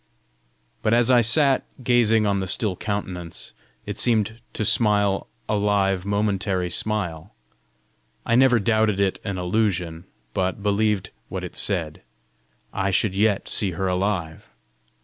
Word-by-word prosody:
But 110 - +2
as 120 +1 +3
I 120 -1 +6
sat 135 +4 +3 0.2
gazing 115 -3 +3
on 100 -1 +1
the 95 - -3
still 100 +1 +1
countenance, 90 -5 -5 0.3
it 105 0 -4
seemed 110 -1 +2
to 110 - -2
smile 105 -3 +2 0.2
a - - 0
live 100 -2 +1
momentary 100 -3 -1
smile. 95 -2 -3 0.9
I 115 - 0
never 125 -1 +5
doubted 110 -1 +1
it 100 -1 0
an 100 -3 -4
illusion, 90 -3 -1 0.3
yet 95 +1 -1
believed 105 -2 0 0.2
what - - -5
it - - -7
said: 85 -7 -1 0.7
I 100 0 -1
should 95 +1 +1
yet 105 0 +1
see 100 -5 0
her 95 +3 -2
alive! 90 -3 -2
100 Hz, 135 wpm, -23 LUFS, 95-110 Hz, 0.9 s, I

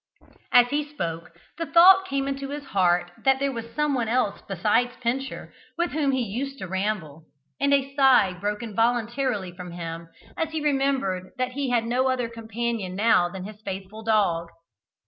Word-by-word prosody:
As 245 0 +6
he 295 +2 0
spoke, 170 - -6 0.2
the 330 - -2
thought 370 +5 +7
came 275 0 -1
into 275 0 -4
his 290 0 -5
heart 180 -6 +1
that 270 -1 +4
there 275 +1 0
was 230 -2 -6
someone 280 -6 0
else 235 -3 0
besides 215 +6 +1
Pincher 255 +3 -3 0.2
with 345 0 0
whom 295 -2 0
he 260 -2 0
used 265 +6 -4
to 190 - -6
ramble, 185 -5 -3 0.3
and 280 - +2
a 275 -1 +2
sigh 260 -9 +5
broke 205 +5 -3
involuntarily 230 -3 -1
from 180 -1 -8
him 165 -1 -6 0.3
as 325 -1 -1
he 320 - -1
remembered 270 -11 0
that 255 0 -1
he 275 0 -2
had 235 -2 +1
no 255 +3 +1
other 250 -2 -1
companion 225 -4 -4
now 200 -4 +3
than 185 +1 -7
his 210 +2 -10
faithful 195 +1 -7
dog. 195 -7 +1
235 Hz, 170 wpm, -25 LUFS, 190-275 Hz, 0.3 s, thought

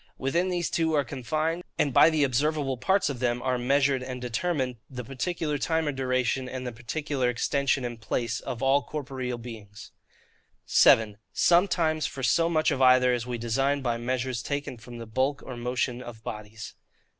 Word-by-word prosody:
Within 170 +8 0
these 175 -2 -1
two 160 -1 +1
are 145 - +3
confined, 155 +7 -2
and 140 - +1
by 160 - +7
the 155 -2 +2
observable 140 +1 +1
parts 190 +11 +1
of 135 -4 -3
them 120 -1 0
are 125 0 -1
measured 135 +1 +2
and 125 0 -5
determined, 125 +1 -2
the 125 -2 -6
particular 145 +4 -2
time 160 0 0
or - - +1
duration, 130 -1 -1
and 130 0 -5
the 125 - -3
particular 125 +3 -2
extension 135 +2 0
and 120 -2 -6
place, 115 +1 -2
of 120 +1 -5
all 135 +2 +4
corporeal 130 -5 -4
beings. 110 -4 -10 0.7
7. 105 -2 +5
Sometimes 165 -3 +3
for 135 -4 -7
so 165 +8 +3
much 155 -1 +2
of 135 -2 -1
either 125 -1 +6
as 120 0 -2
we 120 -1 -3
design 135 +5 0
by 120 -2 0
Measures 125 0 -2
taken 140 0 -3
from 120 +1 -11
the 115 - -7
Bulk 130 +6 -1
or 130 - -6
Motion 125 +1 -2
of 115 -3 -10
Bodies. 105 +1 -7
130 Hz, 180 wpm, -27 LUFS, 120-145 Hz, 0.7 s, by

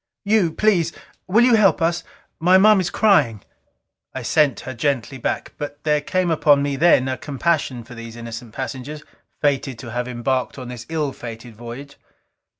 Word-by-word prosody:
"You 200 -5 +3
please, 175 -3 +2 0.4
will 215 +6 +4
you 250 - +4
help 200 -7 +4
us? 170 +1 0 0.4
My 180 +3 +5
Moms 200 -1 +5
is - - -1
crying." 145 - +2 0.7
I - - -4
sent 150 -5 +2
her 130 - -6
gently 130 0 -2
back. - - -3
But 145 -1 -6
there 150 -1 +2
came 180 +3 0
upon 145 -3 +4
me 140 -1 -1
then 140 -3 +4
a 130 -1 -3
compassion 140 -4 -1
for 120 +2 -13
these 115 -1 -9
innocent 115 0 -8
passengers, 135 +4 -6 0.4
fated 135 -3 0
to 120 -1 -9
have 125 +1 -3
embarked 125 +2 -2
on 125 -2 -7
this 120 -2 -8
ill 155 -4 -1
fated 115 -1 -9
voyage. 120 +5 -9
140 Hz, 170 wpm, -21 LUFS, 120-165 Hz, 0.7 s, My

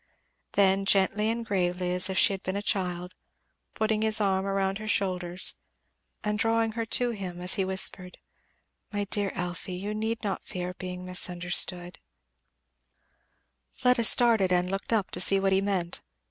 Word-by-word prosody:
Then, 195 -1 +3
gently 200 +2 +2
and 230 0 -3
gravely 180 -3 -1
as 180 +1 +3
if 190 - -3
she 205 - +4
had 190 - -6
been 185 - -4
a 200 - -3
child, 180 -2 -2 0.6
putting 220 -1 0
his 220 0 +2
arm 195 -2 +1
round 195 0 -1
her 215 - -7
shoulders 185 -3 +2 0.7
and 210 0 -2
drawing 225 +1 +1
her 225 0 -4
to 245 +1 +3
him 185 -5 -6
he 190 +1 +4
whispered, 190 -1 -3 0.7
"My 205 -1 -2
dear 200 0 -1
Elfie, 180 0 -5
you 200 +3 -4
need 220 +2 -3
not 200 -2 -3
fear 180 0 -5
being 180 -1 -7
misunderstood 180 0 0 0.9
" 65 +1 -46
Fleda 250 -2 +2
started 220 -3 +4
and 180 0 +1
looked 195 +3 -4
up 215 -4 0
to 180 - -2
see 195 +2 +3
what 195 0 +1
he 190 - +3
meant. 190 -4 -2
195 Hz, 160 wpm, -27 LUFS, 180-210 Hz, 0.9 s, she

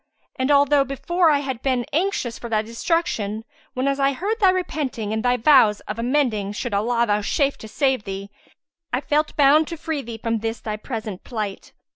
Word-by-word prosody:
And 260 +1 -1
although 285 0 +5
before 335 +6 +1
I 290 -2 +3
had 265 -4 -4
been 255 -3 0
anxious 325 - -1
for 235 - -7
thy 215 -1 +1
destruction, 225 - -2 0.3
whenas 275 +2 0
I 275 0 +3
heard 410 - -2
thy 390 -3 +5
repenting 290 - -2
and 220 - -2
thy 250 0 +2
vows 225 -5 +5
of 215 +2 -6
amending 235 -6 0
should 230 +1 -4
Allah 235 +4 +1
vouchsafe 210 +7 +1
to 220 - -9
save 265 -1 0
thee, 195 0 -6 0.6
I 250 - +1
felt 300 +2 0
bound 295 +2 +5
to 335 - -6
free 320 -2 -3
thee 230 -3 -7
from 230 0 -1
this 225 +1 -3
thy 215 -1 -4
present 215 -3 -6
plight. 210 -5 -5
250 Hz, 185 wpm, -22 LUFS, 220-290 Hz, 0.6 s, although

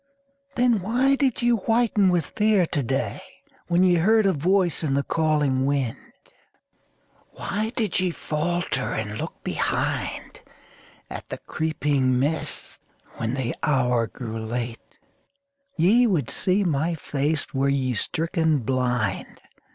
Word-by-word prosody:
Then 245 -3 +3
why 250 +8 +2
did 270 -4 0
ye 240 - +4
whiten 225 -2 +2
with 175 -3 +1
fear 210 -4 +2
to 150 - -2
day 135 +2 -2 0.5
When 175 +1 +3
ye 185 -1 +5
heard 215 +5 +4
a 195 - +3
voice 180 +3 +1
in 140 -3 0
the 140 - +1
calling 150 -5 +1
wind? 140 -5 0 1.4
Why 215 +3 -3
did 220 -5 0
ye 185 0 +1
falter 165 -3 -2
and 105 -1 -4
look - - -6
behind - - -2 0.7
At - - -8
the - - -4
creeping 145 -5 0
mists 150 +4 -2 0.4
when 115 +2 -2
the 130 -3 -2
hour 125 -6 +2
grew 115 -2 -6
late? 115 +1 -4 1.0
Ye 215 +9 +5
would 165 - 0
see 195 +2 +1
my 165 0 0
face 145 0 -1
were 135 +1 +1
ye 130 -2 0
stricken 160 - 0
blind! 125 -4 -1
155 Hz, 130 wpm, -24 LUFS, 130-190 Hz, 1.4 s, ye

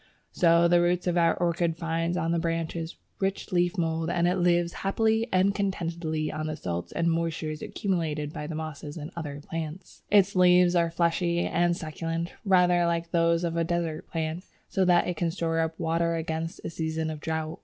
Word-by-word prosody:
So 170 0 +4
the 175 0 +4
roots 175 +1 +1
of 175 -1 +1
our 170 -1 +3
orchid 170 -1 0
find 165 +1 -1
on 165 -1 0
the 170 - +1
branches 165 0 -3 0.2
rich 195 +2 -2
leaf 175 0 +1
mould, 165 -1 0
and 175 0 +2
it 180 +1 +1
lives 175 -1 +2
happily 220 +3 +1
and 190 +2 +3
contentedly 170 -6 -2
on 155 0 -3
the 155 - -3
salts 85 - -4
and 170 - 0
moisture 165 -1 -1
accumulated 155 -2 -2
by 150 - -5
the 160 - -5
mosses 155 -1 -6
and 155 +2 -7
other 145 -4 -5
plants. 165 +2 -6
Its 200 -1 +4
leaves 180 0 +5
are 170 -1 +3
fleshy 170 +1 +1
and 175 0 +1
succulent, 165 +2 -4
rather 180 -3 +4
like 170 0 -1
those 170 0 +2
of 170 -1 -1
a 170 - +1
desert 165 -2 -2
plant, 160 +1 -3 0.2
so 190 -1 +1
that 175 -1 +4
it 180 -2 -2
can 170 0 0
store 165 -1 -1
up 160 0 -1
water 170 0 +1
against 160 0 -3
a - - -3
season 160 -1 -2
of 155 - -6
drought. 160 0 -3
170 Hz, 190 wpm, -27 LUFS, 160-175 Hz, 0.2 s, leaves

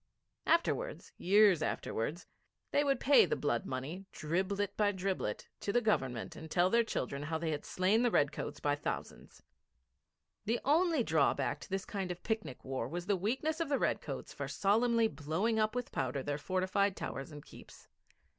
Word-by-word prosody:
Afterwards, - - +1
years 200 -3 +5
afterwards, 155 +4 -2 0.5
they 290 - +3
would 275 -1 +1
pay 285 0 +6
the - - 0
blood 120 -5 -1
money, 150 +9 -5
driblet 195 +5 -1
by 205 -1 +3
driblet, 190 - -3
to 200 - -2
the 240 - +4
Government 130 - -1
and 160 - -9
tell 180 +3 +3
their 235 0 +5
children 140 - -3
how 160 +2 -2
they 160 0 -2
had 150 - -3
slain 190 +5 +2
the 245 - +3
redcoats 145 -8 0
by 145 - +1
thousands. 145 - -5 1.0
The 230 +3 +1
only 320 -1 +3
drawback 155 -8 +1
to - - -11
this 195 +1 -2
kind 195 -3 -3
of 175 0 -6
picnic 220 - -3
war 130 -3 -2
was 175 +5 -5
the 200 +1 +2
weakness 265 - -1
of 330 -3 -1
the 280 - +2
redcoats - - -2
for - - -4
solemnly 230 +3 +3
blowing 165 +8 -1
up 215 +2 +1
with 250 -1 -3
powder 130 +1 -2
their 145 +1 -2
fortified 185 +3 0
towers 135 +4 -5
and 145 -1 -10
keeps. - - -14
190 Hz, 175 wpm, -33 LUFS, 150-225 Hz, 1.0 s, pay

